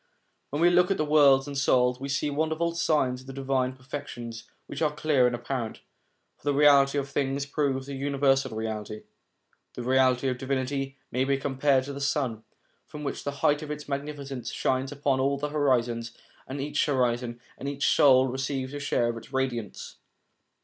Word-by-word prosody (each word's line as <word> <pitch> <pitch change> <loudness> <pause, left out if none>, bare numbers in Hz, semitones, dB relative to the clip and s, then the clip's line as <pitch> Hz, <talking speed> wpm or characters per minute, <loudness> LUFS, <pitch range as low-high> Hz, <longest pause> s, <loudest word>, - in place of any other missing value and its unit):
When 145 +4 -1
we 175 - +6
look 180 +1 +4
at 195 - +1
the 155 - 0
worlds 140 -3 +5
and 145 -1 -6
the - - 0
souls, 125 -2 +3
we 140 +1 -5
see 140 +1 0
wonderful 160 +3 0
signs 145 -7 +1
of 130 - -17
the 135 - -7
divine 130 -1 -1
perfections, 130 -3 -7 0.2
which - - -7
are 155 -2 +2
clear 150 -4 +2
and 120 - -1
apparent; 120 -1 -4 0.6
for - - -32
the 145 0 +1
reality 140 -1 +5
of 140 -1 -1
things 140 0 -1
proves 140 -2 -1
the 140 - -7
Universal 135 -3 +1
Reality. 110 -1 -4 0.7
The 120 - -5
Reality 130 0 +3
of 125 -1 -3
Divinity 135 0 -2
may 130 - +1
be 135 0 +1
compared 135 0 +1
to 140 +1 -6
the 140 - -6
sun, 130 -6 -1 0.5
which 150 -2 -5
from 145 - -3
the 140 - -11
height 150 +1 +3
of 155 - -7
its 150 0 -6
magnificence 140 -3 -5
shines 130 +1 -1
upon 140 -2 0
all 140 +1 +1
the 150 +1 -3
horizons, 120 -6 0 0.3
and 135 +2 -5
each 145 +1 0
horizon, 120 -3 0 0.2
and 140 - -3
each 140 0 -1
soul, 130 -3 +5
receives 130 +1 -3
a 145 - -4
share 120 -4 +1
of 115 - -3
its 115 - -12
radiance. 130 -6 -3
135 Hz, 190 wpm, -27 LUFS, 130-145 Hz, 0.7 s, we